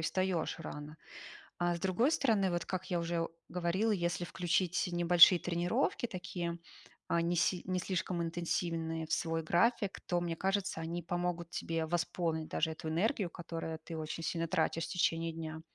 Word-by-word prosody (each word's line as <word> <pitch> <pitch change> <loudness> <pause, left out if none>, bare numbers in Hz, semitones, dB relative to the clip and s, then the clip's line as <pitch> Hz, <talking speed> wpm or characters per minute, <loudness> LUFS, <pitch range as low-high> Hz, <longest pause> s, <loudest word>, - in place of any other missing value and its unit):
и - - -3
встаёшь 180 -1 0
рано. 150 0 -7 0.6
А 175 0 +1
с - - -6
другой 190 - +2
стороны, 215 - +2
вот 175 -1 -1
как 185 0 -4
я 175 - +2
уже 170 0 -1 0.2
говорила, 180 +5 0
если 175 -2 0
включить 180 +1 0
небольшие 175 +1 +7
тренировки, 175 +5 0
такие, 175 -3 -4 0.5
а, 170 - +2
не 170 +1 +1
си 175 +1 +2
не 185 -1 0
слишком 180 -1 -1
интенсивные 165 -1 -1
в - - -2
свой 165 -1 0
график, 200 +4 +2
то, 175 -1 0
мне 170 -1 -2
кажется, 195 -2 -1
они 170 +2 -3
помогут 175 0 -2
тебе 165 -2 -2
восполнить 170 -1 -1
даже 160 0 0
эту 160 0 -5
энергию, 190 - +1
которую 165 -1 -5
ты 165 0 -7
очень 155 +1 -4
сильно 165 0 -1
тратишь 165 -1 +1
в - - -8
течение 165 -2 +1
дня. 160 -1 -6
175 Hz, 170 wpm, -33 LUFS, 165-180 Hz, 0.6 s, небольшие